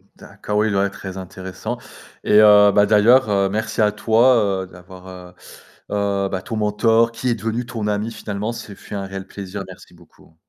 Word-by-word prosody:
D'accord. 105 - -6
Oui, 110 - +2
il 110 - -1
doit 100 0 +1
très 95 -1 -9
intéressant 95 +4 -7 0.5
et 105 - +4
heu, 105 -1 +7
bah, 105 +1 +4
d'ailleurs, 110 +4 +4
heu, 100 -1 +1
merci 110 +3 -2
à 105 -1 +3
toi, 110 -2 +2
heu, - - -10
d'avoir, 90 +1 -14
heu 90 -1 -11 0.6
heu, 100 -1 -1
bah, 95 - -3
ton 115 - -6
mentor, 115 +2 +2
qui 115 +2 -5
est 120 - +1
devenu 115 +3 -3
ton 115 -3 -5
ami, 105 +2 -2
finalement, 105 +2 -5
ce 105 -3 -9
fut - - -10
un 100 -1 -4
réel 95 0 -8
plaisir. 100 0 -7
Merci 90 -1 -14
beaucoup. 85 -1 -22
105 Hz, 195 wpm, -20 LUFS, 95-110 Hz, 0.6 s, heu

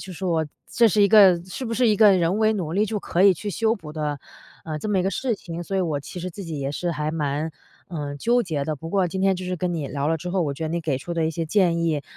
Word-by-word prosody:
就 185 - -8
是 185 - -6
我 165 -3 +1 0.2
这 235 -1 +4
是 205 +2 +3
一 200 - +5
个 190 -5 +6
是 185 +8 -6
不 230 - -2
是 250 +1 +3
一 215 - +4
个 205 -1 +6
人 175 +3 +1
为 220 0 +3
努 170 -6 -3
力 205 +4 +2
就 215 0 -2
可 180 -1 0
以 195 -2 +7
去 205 +5 -5
修 225 +4 +1
补 155 -7 -10
的， 150 -2 -3 0.5
呃， 155 -1 -4
这 215 - -5
么 200 -2 +2
一 - - +2
个 195 - 0
事 240 +5 -1
情。 170 -3 -7
所 195 +3 -3
以 - - +2
我 155 -4 -1
其 175 +5 -8
实 185 - -4
自 195 +3 -8
己 165 -4 -5
也 140 0 -3
是 175 +3 -2
还 150 -1 -2
蛮， 150 0 -2 0.4
嗯， 145 -4 -5
纠 240 - +2
结 155 -7 -2
的。 155 +1 -2
不 165 +4 -8
过 190 0 +1
今 190 +2 -4
天 195 -1 +3
就 185 - -6
是 180 0 -3
跟 175 0 -2
你 155 -4 -3
聊 140 0 -2
了 165 - +1
之 180 +3 -6
后， 185 0 0
我 145 -4 -1
觉 160 - -5
得 155 - -2
你 170 +1 -2
给 155 -5 -1
出 170 +6 -6
的 165 -1 0
一 - - 0
些 165 0 -3
建 170 0 +2
议， 155 -3 0
175 Hz, 335 characters per minute, -23 LUFS, 155-195 Hz, 0.5 s, 以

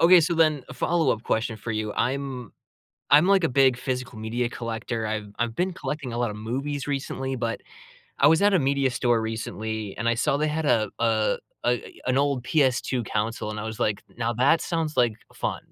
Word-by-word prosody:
Okay, 175 +1 +8
so 170 +2 +1
then 155 -4 +3
a - - -9
follow-up 155 -10 +1
question 110 0 -1
for 115 +2 -5
you, 110 -1 -2
I'm 130 -2 -2 0.6
I'm 150 +5 +7
like 195 -2 +4
a 165 - +3
big 130 -1 +4
physical 125 -3 -4
media 115 +2 -1
collector. 115 -1 -4
I've 105 -1 -3
I've 120 -1 -1
been 180 +1 0
collecting 145 -8 -4
a - - -3
lot 120 -1 0
of 105 - -6
movies 135 +7 -3
recently, 135 -1 -2
but 115 -2 -3 0.6
I 140 - +5
was 160 +5 +5
at 205 0 +5
a 185 - +5
media 140 -1 +2
store 120 -2 +1
recently, 110 -2 -4
and 115 +2 -1
I 115 - +3
saw 130 +4 +1
they 155 +1 +1
had 155 0 -1
a 110 -6 +2
a 110 -2 +2 0.3
a 120 0 -1
an 130 - +2
old 140 -2 +1
PS2 130 -4 +1
console 110 0 -2
and 105 - -5
I - - -5
was 110 -1 -6
like, 105 -2 0
"Now, 120 0 0
that 140 +7 +4
sounds 165 -3 -2
like 120 -3 +3 0.2
fun." - - -2
125 Hz, 205 wpm, -25 LUFS, 115-145 Hz, 0.6 s, Okay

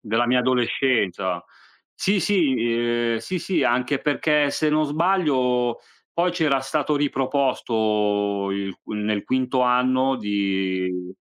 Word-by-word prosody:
Della 115 +2 0
mia 125 +1 +3
adolescenza. 115 -8 0 0.5
Sì, 195 0 +1
sì, 170 -10 +2 0.6
uhm, - - 0
sì, 185 +10 -4
sì, 185 +2 -1
anche 125 +3 +1
perché 150 0 +1
se 155 - 0
non 155 0 +2
sbaglio 145 -7 +1 0.3
poi 175 +1 +1
c'era 155 -6 +1
stato 150 +2 -1
riproposto 110 -8 0
il 100 -1 -4
nel 105 -1 -2
quinto 130 0 0
anno 130 +2 +2
di, 95 -3 -2
125 Hz, 115 wpm, -23 LUFS, 105-145 Hz, 0.6 s, mia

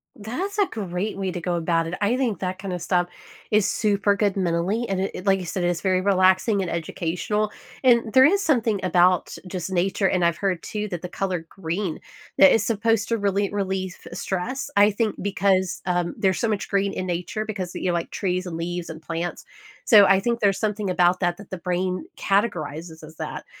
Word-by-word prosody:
That's 285 - -4
a 405 - +4
great 195 - -4
way 190 -2 -2
to 175 - -4
go 175 +1 -2
about 165 0 0
it. 170 - -5
I 215 +5 +2
think 245 -6 -1
that 185 0 -3
kinda 190 -2 -4
stuff 175 +1 +1 0.4
is 210 -2 +4
super 205 -1 +2
good 200 -1 +1
mentally, 190 +5 0
and 195 -1 -1
it 190 -1 -4
like 195 -1 +3
I 185 - -5
said, 175 +1 -3
it's 175 -1 0
very 185 -1 +2
relaxing 190 +2 +3
and 185 - -2
educational. 175 +6 -2 0.3
And 235 -3 +4
there 260 0 +8
is 395 +6 +3
something 230 - +2
about, 180 0 +3
just 180 0 -5
nature, 190 +2 +1
and 180 -2 +2
I've 170 0 +1
heard 190 -4 -1
too 210 0 -3
that 175 -4 -4
the 180 - -5
color 180 -4 -3
green, 180 -1 -3 0.4
that 290 0 +8
is 225 - +3
supposed 225 -1 +1
to 230 - +1
really 200 -1 0
relieve 190 -2 -2
stress. 210 +9 -3
I 205 +1 +6
think 215 +1 -1
because, 190 -2 +1
um, 175 -1 -1
there's 190 -4 +1
so 230 - +1
much 210 -2 -2
green 200 0 +1
in 185 - -4
nature 180 +5 -3
because, 190 -5 -4
you - - -4
know, 175 - +1
like 170 -1 -2
trees 185 -2 -1
and 170 -3 -5
leaves 175 +1 -4
and 160 0 -8
plants. 165 +2 -4 0.4
So, 210 -4 +8
I 195 0 +5
think 235 +3 -1
there's 200 -3 +2
something 210 -2 -1
about 180 0 +3
that 175 -1 +1
that 205 - -13
the 185 - -5
brain 180 - -2
categorizes 165 -6 -1
as 155 +1 -12
that. - - -6
190 Hz, 205 wpm, -24 LUFS, 175-210 Hz, 0.4 s, there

